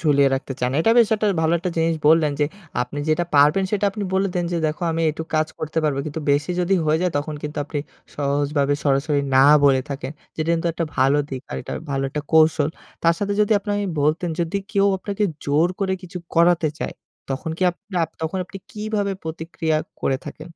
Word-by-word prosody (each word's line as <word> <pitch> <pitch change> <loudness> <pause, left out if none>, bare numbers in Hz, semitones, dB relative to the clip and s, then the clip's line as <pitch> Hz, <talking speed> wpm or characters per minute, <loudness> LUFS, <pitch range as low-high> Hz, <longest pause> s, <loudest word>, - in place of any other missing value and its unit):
ঝুলিয়ে 140 -3 +4
রাখতে 135 0 -4
চান। 125 - +1
এটা 225 - +3
বেশ 230 -3 +6 0.3
ভালো 160 +1 +2
একটা 180 +2 -3
জিনিস 165 0 +2
বললেন 155 -2 +4
যে - - +5 0.4
আপনি 125 +4 -6
যেটা 155 +3 +2
পারবেন 150 +7 +5
সেটা 205 -1 0
আপনি 210 0 -5
বলে 195 +1 +2
দেন 175 - 0
যে, - - 0
"দেখো 155 +2 -3
আমি 165 - -1
এইটুক 160 +1 -4
কাজ 155 0 +2
করতে 155 +1 -3
পারব।" 145 -3 +1
কিন্তু 155 +2 -4
বেশি 145 +5 0
যদি 180 +2 +2
হয়ে 155 +1 +3
যায় 180 -2 +1
তখন 150 +1 -4
কিন্তু 150 +1 -5
আপনি 145 0 -4 0.4
সহজভাবে 145 0 +1
সরাসরি 145 +1 +2 0.2
না 135 - +7 0.2
বলে 135 -2 +5
থাকেন। 140 +1 -4 0.2
যেটা 155 0 -2
কিন্তু 165 +1 -2
একটা 165 +1 -2
ভালো 135 +3 +4
দিক 130 -1 -5
আর - - -3 0.3
ভালো 135 0 0
একটা 150 +2 -3
কৌশল। 155 -2 +5 0.3
তার 165 0 +4
সাথে 205 0 -1
যদি 210 +1 +3
আপনি 205 +1 -6 0.3
বলতেন 160 +4 +1
যদি 170 +4 -1 0.2
কেউ 200 -2 +3
আপনাকে 200 +2 -3 0.2
জোর 150 +4 +3
করে 190 -1 +1
কিছু 180 0 -7 0.2
করাতে 170 -1 +4
চায় - - -3 0.4
তখন 145 +5 -3
কি 185 - -3
আপ 175 - -15 0.2
আ - - +3 0.2
তখন 160 +4 -2
আপনি 195 +2 -10
কিভাবে 210 -2 -2
প্রতিক্রিয়া 160 0 -2 0.3
করে 135 - +1
থাকেন? 155 +2 -8
160 Hz, 200 wpm, -22 LUFS, 145-175 Hz, 0.4 s, না